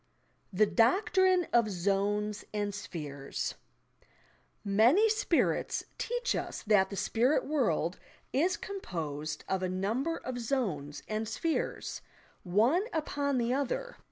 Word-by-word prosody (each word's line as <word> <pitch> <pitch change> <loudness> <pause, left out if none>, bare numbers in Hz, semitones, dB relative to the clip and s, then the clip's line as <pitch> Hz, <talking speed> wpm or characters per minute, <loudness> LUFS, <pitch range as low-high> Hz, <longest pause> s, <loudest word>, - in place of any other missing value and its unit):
THE 210 +3 +4
DOCTRINE 365 - +3
OP 235 -2 +5
"ZONES" 205 +2 0
AND 205 -1 -1
"SPHEHES" 150 -8 -5 1.1
Many 235 - +5
"spirits" 430 - +1 0.2
teach 485 +1 -1
us - - -4
that 205 -3 +4
the 200 - -5
spirit 240 +8 +2
world 195 - 0 0.3
is 335 +8 +2
composed 155 - -5
of 190 -1 0
a 185 - -1
number 225 - -1
of 250 -1 -5
"zones" 195 - -2
and 215 +1 -2
"spheres," 330 -1 -2 0.4
one 230 - +3
upon 285 -3 -1
the 240 0 +1
other. 285 - -2
220 Hz, 115 wpm, -31 LUFS, 190-295 Hz, 1.1 s, OP